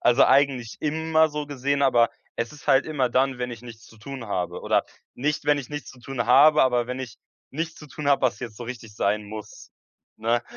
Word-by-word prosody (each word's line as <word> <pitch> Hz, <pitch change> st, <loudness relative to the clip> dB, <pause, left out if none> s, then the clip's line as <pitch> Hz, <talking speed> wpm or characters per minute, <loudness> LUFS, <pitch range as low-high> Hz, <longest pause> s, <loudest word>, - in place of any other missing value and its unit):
also, 120 Hz, +2 st, +5 dB
eigentlich 135 Hz, -5 st, +2 dB
immer 160 Hz, +1 st, +2 dB
so 150 Hz, -1 st, -4 dB
gesehen. 140 Hz, 0 st, -1 dB
Aber 120 Hz, -3 st, +4 dB, 0.3 s
es 115 Hz, +4 st, -3 dB
ist 150 Hz, -, -14 dB
halt 135 Hz, -2 st, +4 dB
immer 135 Hz, -6 st, 0 dB
dann, 130 Hz, +1 st, +2 dB
wenn 125 Hz, 0 st, -3 dB
ich 120 Hz, -2 st, -8 dB
nichts 115 Hz, -2 st, -12 dB
zu 110 Hz, -, -17 dB
tun 130 Hz, +1 st, -8 dB
habe 90 Hz, -4 st, -3 dB
oder -, -, +2 dB, 0.3 s
nicht, 150 Hz, +3 st, -1 dB
wenn 145 Hz, 0 st, +3 dB
ich 135 Hz, -, -7 dB
nichts 145 Hz, -1 st, -6 dB
zu 130 Hz, -, -16 dB
tun 120 Hz, -2 st, -3 dB
habe, 150 Hz, +5 st, +6 dB
aber 125 Hz, -2 st, +2 dB
wenn 125 Hz, +1 st, -4 dB
ich 125 Hz, -4 st, -7 dB, 0.3 s
nichts 160 Hz, +3 st, -4 dB
zu 150 Hz, -, -12 dB
tun 145 Hz, +1 st, -4 dB
habe, 140 Hz, -, +3 dB
was 130 Hz, -, +1 dB
jetzt 115 Hz, -4 st, -7 dB
so 120 Hz, -, -7 dB
richtig 115 Hz, -3 st, -8 dB
sein 105 Hz, +1 st, 0 dB
muss, 105 Hz, 0 st, -10 dB, 0.5 s
ne? 115 Hz, +2 st, 0 dB
130 Hz, 220 wpm, -25 LUFS, 120-145 Hz, 0.5 s, habe